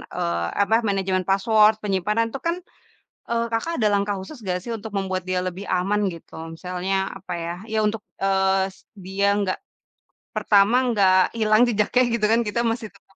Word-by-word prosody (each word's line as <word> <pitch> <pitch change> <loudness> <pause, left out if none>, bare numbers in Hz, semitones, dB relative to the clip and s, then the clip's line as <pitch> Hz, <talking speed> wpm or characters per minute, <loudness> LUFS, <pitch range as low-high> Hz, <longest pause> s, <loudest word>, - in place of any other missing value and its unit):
eee, 85 0 -1 0.2
apa 220 +2 +2
manajemen 190 -2 0
password, 215 +2 +4
penyimpanan 210 +3 0
itu 270 - -5
kan, 335 - +1 0.7
eee, 235 0 +1
Kakak 280 +9 -1
ada 215 - +4
langkah 200 0 +1
khusus 190 +10 -9
nggak 180 -1 -1
sih, 235 - -8
untuk 220 +1 -8
membuat 185 -2 -2
dia 185 0 +1
lebih 185 +2 -6
aman 195 +3 0
gitu, 165 - -14 0.2
misalnya 180 +2 -3 0.2
apa - - -7
ya, 170 - -3 0.2
ya - - +1
untuk, 215 0 0 0.2
eee, 190 0 +2 0.4
dia 195 +1 -1 0.2
nggak 185 -2 -1 0.8
pertama 205 +3 +4
nggak 200 -5 +4 0.2
hilang 215 0 +4
jejaknya 225 +3 +2
gitu 215 -2 +1
kan, 230 +1 +4
kita 210 - -1
masih 225 -1 -4
tetap 195 -1 -26
200 Hz, 170 wpm, -23 LUFS, 190-220 Hz, 0.8 s, password